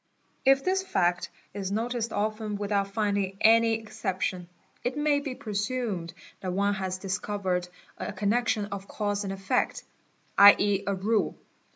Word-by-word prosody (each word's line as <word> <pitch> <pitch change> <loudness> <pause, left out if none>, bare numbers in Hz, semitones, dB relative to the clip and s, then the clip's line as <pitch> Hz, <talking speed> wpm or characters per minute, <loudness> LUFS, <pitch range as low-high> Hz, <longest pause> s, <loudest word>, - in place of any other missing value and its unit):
If 270 0 +5
this 380 +1 +1
fact 175 - 0 0.2
is 195 -1 -4
noticed 230 +2 -1
often 215 0 -2
without 200 -1 0
finding 200 -2 -1
any 230 +1 +5
exception, 195 -5 -3 0.3
it 250 +3 -2
may 295 -1 +2
be 280 -3 -5
presumed 205 -5 -3 0.2
that 185 -1 -3
one 200 +2 +2
has 190 -2 -3
discovered 190 -2 -2 0.3
a - - -3
connection 210 +2 +1
of 200 -1 -7
cause 205 -1 -2
and 195 - -3
effect, 195 0 -1 0.6
7.e., 200 0 +7
a 200 - +1
rule. 210 +3 0
205 Hz, 140 wpm, -28 LUFS, 195-225 Hz, 0.6 s, 7.e